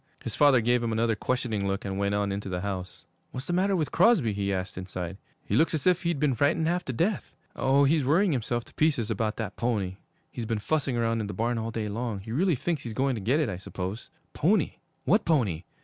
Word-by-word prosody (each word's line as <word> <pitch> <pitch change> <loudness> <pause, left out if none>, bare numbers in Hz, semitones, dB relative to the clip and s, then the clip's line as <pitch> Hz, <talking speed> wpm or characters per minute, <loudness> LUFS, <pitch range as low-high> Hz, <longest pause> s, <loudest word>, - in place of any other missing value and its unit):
His - - -4
father 140 -4 +5
gave 120 +2 +2
him 115 -1 -1
another 115 0 +1
questioning 110 -4 -1
look 100 +2 -2
and 95 -1 -3
went 100 0 +1
on 100 -1 0
into 100 0 -4
the 90 -1 -2
house. 95 -2 -5 0.2
'What's 130 +2 -6
the 175 - -2
matter 190 +2 +2
with 160 -5 -1
Crosby?' 170 - +4
he 100 0 -1
asked 95 0 -3
inside. 90 0 -5 0.3
'He - - -1
looks 160 +1 +3
as 150 - -3
if 180 -1 +4
he'd 170 -4 -1
been 145 -2 +2
frightened 145 +6 +2
half 175 +1 0
to - - -2
death.' 185 - -1 0.2
'Oh, 135 +1 +3
he's 150 +1 +3
worrying 170 +8 +3
himself 120 -3 -1
to - - -18
pieces 140 -8 +1
about 110 0 -1
that 105 -3 -4
pony. 105 -6 -1 0.3
He's 115 -2 -5
been 115 - 0
fussing 135 +3 0
round 115 -1 +1
in 105 - -3
the 105 - -6
barn 115 +1 0
all 110 0 -3
day 110 -1 -3
long. 110 0 -3
He 110 +3 -8
really 170 +7 +2
thinks 150 +3 -2
he's 115 -4 -6
going 135 +2 +1
to 110 - -4
get 125 +10 +2
it, 155 - +1
I 95 -4 -3
suppose.' 95 +4 -6 0.2
'Pony? 180 +2 +1 0.3
What 210 +4 +4
pony? 105 - +1
120 Hz, 240 wpm, -27 LUFS, 100-150 Hz, 0.3 s, father